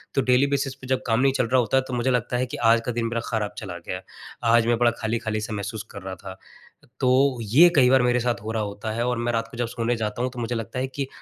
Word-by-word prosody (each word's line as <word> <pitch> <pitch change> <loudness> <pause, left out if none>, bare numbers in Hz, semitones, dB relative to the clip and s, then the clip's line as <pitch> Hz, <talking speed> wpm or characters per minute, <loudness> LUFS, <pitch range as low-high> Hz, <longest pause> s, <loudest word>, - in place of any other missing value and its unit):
तो 135 - +3
daily 125 +2 +3
basis 135 -1 -1
पे 130 -1 -12
जब 130 0 0
काम 115 0 +2
नहीं 135 +1 +3
चल 125 -3 0
रहा 130 +2 +3
होता 120 +3 +1
है 130 - +2
तो 130 - -6
मुझे 125 +2 +1
लगता 125 0 0
है 125 - 0
कि 120 - -7
आज 115 0 +4
का 125 - -1
दिन 120 -1 -2
मेरा 115 0 -2
खराब 110 -3 -2
चला 90 -5 -6
गया। 90 - -4 0.5
आज 115 -1 +4
मैं 120 0 +3
बड़ा 120 0 +4
खाली-खाली 110 -1 -2
सा 110 +1 -5
महसूस 105 +1 -4
कर - - -9
रहा 95 0 -6
था। 95 -1 -10 0.6
तो, 130 0 +3
ये 130 +12 +6
कई 130 -4 +6
बार 130 0 +5
मेरे 125 0 +2
साथ 120 0 -1
हो 110 - -4
रहा 110 -1 -1
होता 105 +1 -5
है 115 +2 -1
और 125 -1 0
मैं 120 +1 -1
रात 115 0 -1
को 120 - -10
जब 120 -1 -1
सोने 120 0 -1
जाता 110 0 -3
हूँ 125 - 0
तो 125 - -8
मुझे 120 +1 -2
लगता 115 +2 -4
है 130 - -1
कि 135 +1 -4
120 Hz, 295 wpm, -24 LUFS, 110-125 Hz, 0.6 s, ये